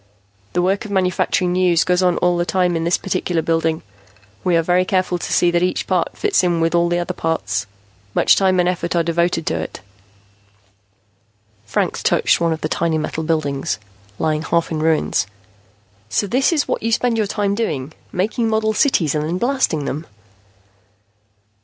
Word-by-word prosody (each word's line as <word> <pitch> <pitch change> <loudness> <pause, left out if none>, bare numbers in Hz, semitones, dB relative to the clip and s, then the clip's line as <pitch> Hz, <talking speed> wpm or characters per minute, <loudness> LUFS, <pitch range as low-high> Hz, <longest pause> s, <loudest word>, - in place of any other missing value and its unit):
The 175 - +1
work 195 +4 +1
of 215 - -8
manufacturing 185 -1 +1
news 180 -2 +3
goes 180 +1 +1
on 180 -1 +2
all 180 0 +2
the 175 - +1
time 180 -1 +1
in 165 0 -1
this 170 - +2
particular 180 -3 -1
building. 165 -1 0 0.6
We 175 -2 +3
are 165 - +2
very 180 +2 +3
careful 185 -1 0
to - - -5
see 175 - +3
that 175 0 +1
each 180 0 0
part - - -1
fits 415 - +2
in 175 -2 +1
with 165 0 +1
all 170 0 +3
the 175 - +1
other 175 +1 -2
parts. 105 - -2 0.5
Much - - +5
time 190 -2 +2
and 175 - +3
effort 180 -1 -1
are 170 - +3
devoted 170 0 0
to - - -1
it." - - -6 1.9
Franks - - -1
touched - - +2
one 170 -1 +2
of 160 - -3
the - - -1
tiny 165 0 0
model 155 +1 -3
buildings, 145 - -1 0.4
lying 155 -1 0
half 170 +1 0
in 155 - -2
ruins. 155 -8 +1 0.8
"So 115 - +1
this 255 - +2
is 310 -4 +1
what - - -1
you 230 - -1
spend 240 +1 +1
your 210 - +1
time 200 -1 -1
doing 155 - -2 0.2
making 220 +5 0
model 220 0 +1
cities 210 - +2
and 150 -1 -1
then 165 +4 -2
blasting 240 - 0
them." 155 +4 -4
175 Hz, 185 wpm, -19 LUFS, 160-185 Hz, 1.9 s, Much